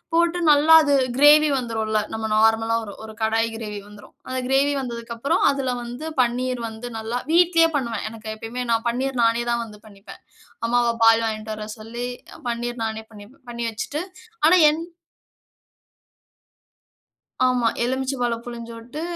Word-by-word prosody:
போட்டு 340 +1 +2
நல்லா 300 +2 +6
அது 285 -1 +2 0.2
கிரேவி 300 +1 +7
வந்துரும்ல, 220 -3 -1
நம்ம 220 0 -3
நார்மலா 225 +1 +3
ஒரு 200 - -9
ஒரு 220 0 -11
கடாய் 225 +1 +1
கிரேவி 210 -2 -6
வந்துரும். 210 0 -15
அந்த 255 0 -2
கிரேவி 280 +2 +2
வந்ததுக்கு 235 -2 -6
அப்புறம், 275 - 0
அதுல 265 -2 -2
வந்து 245 +6 -7 0.2
பன்னீர் 250 0 -1
வந்து 220 +2 -8
நல்லா 230 +3 -3
வீட்டுலேயே 335 -1 +5
பண்ணுவேன். 235 -6 -3
எனக்கு 220 -1 -7
எப்பையுமே 235 +3 -5
நான் 230 +1 +1
பன்னீர் 255 +1 -2
நானே 230 +1 +2
தான் 235 0 0
வந்து 210 -1 -13
பண்ணிப்பேன். 200 -1 -14 0.5
அம்மாவ 240 0 +2
பால் 225 0 +6
வாங்கிட்டு 215 0 -4
வர 215 0 -7
சொல்லி, 235 +3 -6 0.4
பன்னீர் 235 0 -3 0.2
நானே 220 0 -4
பண்ணிப்பேன் 215 +5 -15
பண்ணி 235 0 -5
வைச்சிட்டு. 245 +7 -4 0.5
ஆனா 345 +3 +7
என் 315 +2 -2 2.6
ஆமா, 250 -2 +2 0.2
எலுமிச்சைபழம் 250 -2 -2
பிழிஞ்சு 235 -1 -7
விட்டு 240 +7 -8
235 Hz, 145 wpm, -22 LUFS, 225-260 Hz, 2.6 s, கிரேவி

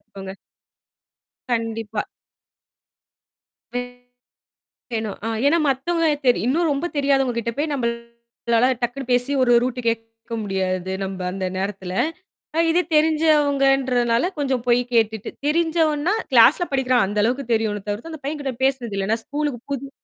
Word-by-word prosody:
துக்கோங்க. 195 -1 -10 1.1
கண்டிப்பா. 225 -2 -2 1.7
வே 245 - 0 1.1
யேணும் 220 -2 -3
அ - - 0 0.2
ஏன்னா 330 +4 +4
மத்தவங்கள 320 +5 +1 0.2
தெரி 245 - +5
இன்னும் 320 +5 +2
ரொம்ப 280 +4 -1
தெரியாதவங்க 270 -3 +2
கிட்ட 235 0 -1
போய் 300 +1 0
நம்பளால 235 -2 -2 0.2
டக்குன்ன்னு 245 +2 -3
பேசி 245 +2 +2
ஒரு 245 - +4
ரூட்டு 250 0 -2
கேக்க 225 0 -4
முடியாது, 190 -2 -2
நம்ப 190 -1 -5
அந்த 190 0 -3
நேரத்துல. 190 -1 -4 0.6
அ - - +1
இது 345 +2 +3
தெரிஞ்சவங்கன்றதுனால 280 -4 +3
கொஞ்சம் 265 -4 0
போய்க் 245 +1 +2
கேட்டுட்டு 220 -2 +1 0.2
தெரிஞ்சவன்னா, 320 +1 +2 0.2
கிளாஸ்ல 260 +8 +6
படிக்கிறான் 255 -3 +3
அந்த 205 +2 -1
அளவுக்குத் 245 +2 0
தெரியும்ல 215 -2 -1
தவிர்த்து, 210 +11 -4
அந்தப் 310 -3 -10
பையன் 295 +1 -3
கிட்ட 270 -2 -2
பேசுனது 255 -6 0
இல்ல. 195 +1 -1
நா 225 - +3
ஸ்கூல்க்கு 290 -4 -3
புது 275 0 -4
245 Hz, 130 wpm, -22 LUFS, 225-285 Hz, 1.7 s, கிளாஸ்ல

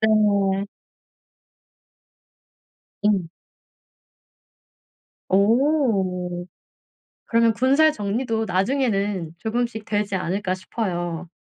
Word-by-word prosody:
네. 200 -3 +3 2.4
음. 200 -5 +2 2.0
어. 200 - +1 0.8
그러면 230 0 +3
‘군살 275 +7 +4
정리도 225 +1 -2
나중에는 195 - 0
조금씩 225 +1 -2
되지 210 -2 -1
않을까.‘ 185 +1 -1
싶어요. 175 -4 -4
205 Hz, 135 characters per minute, -23 LUFS, 185-230 Hz, 2.4 s, 군살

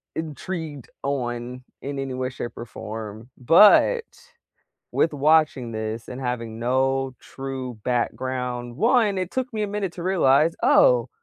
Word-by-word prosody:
intrigued 160 -2 -5
on 125 -2 -3 0.2
in 140 0 -5
any 135 -1 -3
way, 130 0 -2
shape 125 -2 -7
or 120 - -6
form. 110 0 -8
But, 210 - +6 0.9
with 165 - +2
watching 150 -4 +2
this 110 +1 -4
and 125 +2 -7
having 115 -3 -3
no 130 +2 0
true 130 -3 -6
background, 125 0 -2
1, 225 - +3
it 185 -1 -2
took 260 +1 -3
me 215 - -2
a - - -1
minute 200 -2 -3
to 175 - -7
realize, 165 -4 +3
"Oh, - - +5
135 Hz, 140 wpm, -24 LUFS, 120-165 Hz, 0.9 s, But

